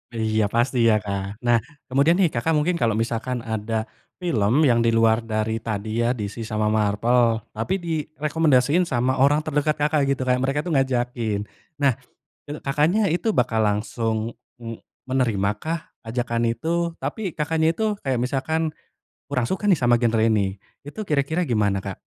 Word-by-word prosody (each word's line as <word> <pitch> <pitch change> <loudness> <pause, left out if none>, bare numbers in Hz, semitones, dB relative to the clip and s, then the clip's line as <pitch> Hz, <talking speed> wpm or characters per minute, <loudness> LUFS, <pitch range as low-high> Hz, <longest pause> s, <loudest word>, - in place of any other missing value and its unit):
Iya. 110 -2 +1
Pasti 120 +1 +2
ya, 110 - +4
kan. 100 0 -4
Nah, 120 -1 +4 0.2
kemudian 140 +6 +3
nih, 180 -5 +2
Kakak 160 +7 0
mungkin 170 +4 +1
kalo 115 -2 +2
misalkan 120 +2 -2
ada 110 0 -2 0.3
film, 145 - +2
yang 120 -3 +4
di 115 - +3
luar 115 0 +3
dari 110 0 -2
tadi, 110 +1 -2
ya, 115 - +2
DC 105 +2 -5
sama 110 -1 -1
Marvel, 110 +2 +2 0.2
tapi 115 - -1
direkomendasiin 155 -2 +1
sama 130 +2 +1
orang 145 +2 +3
terdekat 150 0 0
Kakak, 150 0 +2
gitu. 130 -1 0
Kayak 125 0 +2
mereka 135 +2 0
tu 170 - -2
ngajakin. 120 -6 0 0.3
Nah, 140 -3 +3 0.5
itu, 150 +1 -5
Kakaknya 160 +9 +2
itu 205 +6 0
bakal 115 -2 +2
langsung, 110 +2 -1 0.3
e 115 -1 -6 0.2
menerima 115 -7 +1
kah 165 0 -4 0.2
ajakan 120 0 -1
itu? 170 +2 -1
Tapi, 180 +6 -3
Kakaknya 160 +2 +1
itu 220 - -1
kayak 130 - -1
misalkan, 155 +5 -1 0.6
kurang 125 -4 0
suka 205 - -1
nih 175 - +4
sama 120 -1 +3
genre 115 -2 +2
ini. 100 -3 +1 0.3
Itu 180 +10 -7
kira-kira 155 +4 0
gimana, 105 -5 +1
Kak? 100 -1 -6
125 Hz, 160 wpm, -23 LUFS, 110-150 Hz, 0.6 s, ya